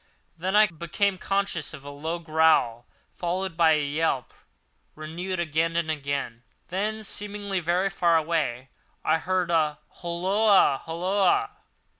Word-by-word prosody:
Then 185 +4 -2
I 215 +1 +8
became 180 +2 -1
conscious 195 -9 -1
of 140 - -14
a 145 - -7
low 160 +4 -4
growl, 160 -8 +2 0.3
followed 180 0 -3
by 165 -1 +5
a 150 -1 +1
yelp, 145 -3 -1 0.6
renewed 170 +4 -5
again 165 0 0
and 170 -2 0
again. 140 -5 -3 0.3
Then, 215 +4 -2
seemingly 205 -1 -3
very 180 +3 0
far 170 -3 +3
away, 150 -6 -1 0.4
I 160 +1 +3
heard 180 0 0
a 155 -3 +2
"Holloa! 185 -2 +2
holloa!" 195 - +1
170 Hz, 130 wpm, -26 LUFS, 155-190 Hz, 0.6 s, I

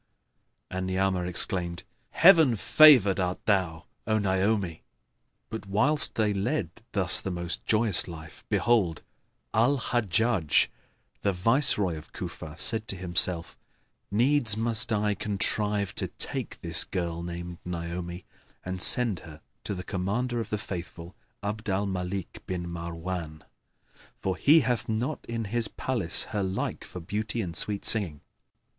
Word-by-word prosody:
And 95 0 -3
Ni'amah 95 -1 0
exclaimed, 90 -1 +3 0.3
"Heaven 165 -9 +6
favoured 115 -5 +6
art 90 0 -3
thou, 90 -6 0 0.2
O 110 0 +2
Naomi!" 95 -3 -1 0.7
But 110 -2 -6
whilst 135 +10 +2
they 105 -2 +1
led 100 0 -2 0.2
thus - - +5
the - - -4
most 85 -1 -4
joyous 110 -5 +3
life, 80 -2 -11
behold! 100 -10 +1 0.5
Al 120 +6 +3
Hajjбj,[FN#6] 110 - +1 0.5
the 100 - 0
Viceroy 100 - +3
of 75 - -17
Cufa 80 +1 -8
said 110 +1 +2
to 100 - -1
himself, 90 -1 +1 0.5
"Needs 115 0 +3
must 115 +1 +1
I 105 -1 +1
contrive 105 0 0
to - - -2
take - - -2
this - - +2
girl 85 -2 -4
named 85 0 -7
Naomi 85 +1 -6 0.4
and 90 0 -4
send 115 -6 +4
her 80 -1 -13 0.3
to 100 - -3
the 90 - -6
Commander 110 +7 -2
of 110 - -7
the 105 - -2
Faithful, 90 -3 -8 0.3
Abd 110 +2 -4
al 95 +2 0
Malik 95 -1 -5
bin 90 -2 -4
Marwбn, 85 -1 -6 0.8
for 95 -1 -2
he 155 +3 +5
hath 125 -3 -2
not 120 +7 -2
in 115 -1 -4
his 120 -2 0
palace 110 -10 -1
her 105 - -1
like 95 0 -3
for 90 - -9
beauty 105 +6 -3
and 85 -3 -6
sweet 105 -1 0
singing." 90 -10 +3
95 Hz, 140 wpm, -27 LUFS, 90-110 Hz, 0.8 s, Heaven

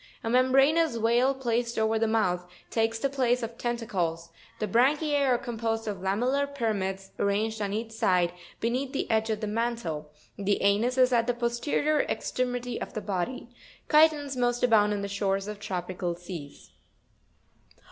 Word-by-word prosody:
A 225 - -1
membranous 270 +4 +4
veil 240 +4 +2
placed 235 -2 -1
over 220 0 +2
the 225 - +2
mouth, 180 -5 0 0.2
takes 225 0 +1
the 250 - 0
place 250 -3 +1
of 230 0 -5
tentacles; 190 -9 -2 0.3
the 215 - -2
branchiz 285 - +2
are 245 - +4
composed 225 -2 -3
of 205 -2 -2
Fig. 185 - -9
79.—cuTon. 255 +8 +1
lamellar 280 - -13
pyramids, 195 -5 -2
arranged 215 +2 0
on 200 -1 -1
each 220 +2 -3
side, 180 -5 +2 0.3
beneath 255 +4 -1
the 275 - -2
edge 220 0 +1
of 215 0 -1
the - - -1
mantle; 210 -9 -2 0.3
the 200 0 0
anus 215 +6 +2
is 255 -1 +4
at 230 -1 +3
the 245 - +1
posterior 245 +5 0
extremity 245 -1 -2
of - - -6
the 215 - -2
body. 200 +6 -3 0.4
Chitons 300 -3 +4
most 245 -1 0
abound 215 -4 +4
on 205 -1 -2
the - - -2
shores 195 0 -1
of 210 -1 -6
tropical 180 -2 -3
seas. 170 -5 -9
225 Hz, 165 wpm, -28 LUFS, 200-250 Hz, 0.4 s, membranous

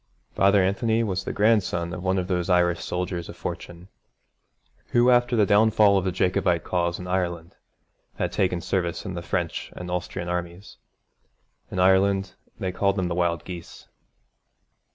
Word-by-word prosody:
Father 100 0 +4
Anthony 110 +4 +1
was 95 -4 -2
the - - -2
grandson 100 -6 +1
of 90 - -5
one 95 +1 0
of 90 -1 -1
those 90 -1 -1
Irish 90 -1 +2
soldiers 90 -1 -3
of - - -10
fortune 85 +1 -7 1.1
who, 120 +1 +5
after 120 0 +3
the 105 -3 +4
downfall 105 0 +4
of 95 -1 +1
the 95 - 0
Jacobite 90 -2 +1
cause 85 -1 -1
in 90 - -8
Ireland, 85 -2 -2 0.6
had - - -2
taken 90 -2 0
service 90 0 -2
in 95 - -4
the 85 - -5
French 85 -2 -3
and 90 0 -7
Austrian 90 0 -4
armies. 90 +2 -5 0.9
In - - -6
Ireland 95 +1 +3 0.2
they 95 - -3
called 100 +1 +1
them 95 -3 -1
the - - -1
Wild 85 -2 0
Geese. 85 -2 -10
90 Hz, 160 wpm, -25 LUFS, 85-100 Hz, 1.1 s, who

